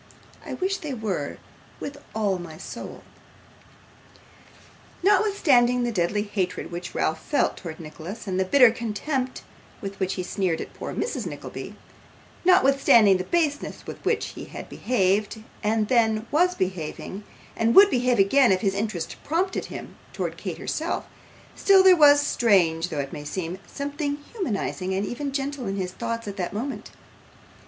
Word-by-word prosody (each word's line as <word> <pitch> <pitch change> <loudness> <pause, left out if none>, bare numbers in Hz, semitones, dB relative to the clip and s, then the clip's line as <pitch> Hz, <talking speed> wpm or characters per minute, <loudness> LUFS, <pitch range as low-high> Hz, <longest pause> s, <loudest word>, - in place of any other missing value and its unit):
I - - -5
wish 385 +1 -1
they 290 -4 -5
were, 195 -11 -3 0.4
with 285 0 -6 0.2
all 205 -4 0
my 165 -3 -9
soul.' - - -8 2.0
Notwithstanding 335 - +4
the 240 - 0
deadly 205 +1 0
hatred 185 -4 -3
which 175 +1 -6
Ralph 160 0 0
felt 290 - +1
towards 160 -3 -8
Nicholas, 170 +7 -8
and 190 -2 -2
the - - +3
bitter 250 +3 +6
contempt 250 +4 -3 0.4
with 195 -1 -7
which 190 -1 -1
he 185 - -3
sneered 180 -2 -1
at - - -7
poor - - -6
Mrs - - -2
Nickleby - - -7 0.7
notwithstanding 275 - +5
the 185 - -3
baseness 305 - -1
with - - -9
which - - 0
he - - -9
had - - -9
behaved, 215 -1 0 0.2
and 215 0 +2 0.5
was 360 +4 +3
then - - -20
behaving, 185 +2 -4 0.3
and 230 +1 +1
would 400 0 +9
behave 250 -1 +2
again 235 +5 +5
if 185 - +2
his 195 -3 +1
interest 200 -5 -3
prompted 365 +5 -1
him, - - -9 0.2
towards - - -3
Kate - - -4
herself - - -3 0.5
still 390 -1 +5
there 375 -1 +8
was, 290 -3 +7
strange 180 - +2
though 160 - -5
it 140 - -7
may 145 - -6
seem, 175 +4 -4
something 285 +1 -3 0.2
humanising 200 - -2
and 195 +2 0
even 275 +6 -4
gentle 275 -1 -3
in 195 - -2
his 185 -2 -3
thoughts 230 +2 -4
at 200 0 -6
that 180 -1 -3
moment. 255 +7 -4
220 Hz, 155 wpm, -25 LUFS, 185-280 Hz, 2.0 s, would